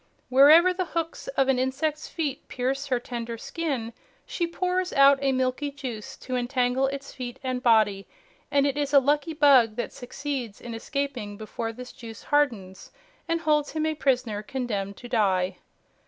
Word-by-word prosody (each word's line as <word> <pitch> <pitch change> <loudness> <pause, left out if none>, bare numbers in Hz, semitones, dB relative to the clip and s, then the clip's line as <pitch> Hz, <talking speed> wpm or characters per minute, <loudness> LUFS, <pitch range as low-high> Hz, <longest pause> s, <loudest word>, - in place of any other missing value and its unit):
Wherever 305 +8 +7
the 365 0 -2
hooks 330 +6 -3
of 270 - +3
an 265 -2 +2
insect's 290 +4 -1
feet 290 -5 -4
pierce 270 +3 -2
her 255 -3 +1
tender 235 -1 -5
skin, 260 -5 -3 0.3
she 345 - -2
pours 365 +1 -1
out 275 0 +6
a 275 -1 +2
milky 260 +2 0
juice 255 -7 -7
to 255 - -2
entangle 250 +1 +1
its 275 0 -6
feet 250 -1 -6
and 255 -1 -2
body, 215 -5 +3 0.4
and 280 0 +3
it 280 0 0
is 290 -1 -1
a - - +10
lucky 295 +4 0
bug 265 -7 +5
that 240 - -4
succeeds 255 -3 -5
in 235 - -7
escaping 245 -4 -4
before 225 +1 -5
this 250 +2 -10
juice 230 -4 -11
hardens, 230 -11 -1 0.4
and 330 0 0
holds 300 -2 +1
him 310 0 -1
a 315 - +1
prisoner 250 -8 0
condemned 210 -5 -4
to 245 - -10
die. 190 -5 +1
260 Hz, 170 wpm, -26 LUFS, 235-290 Hz, 0.4 s, a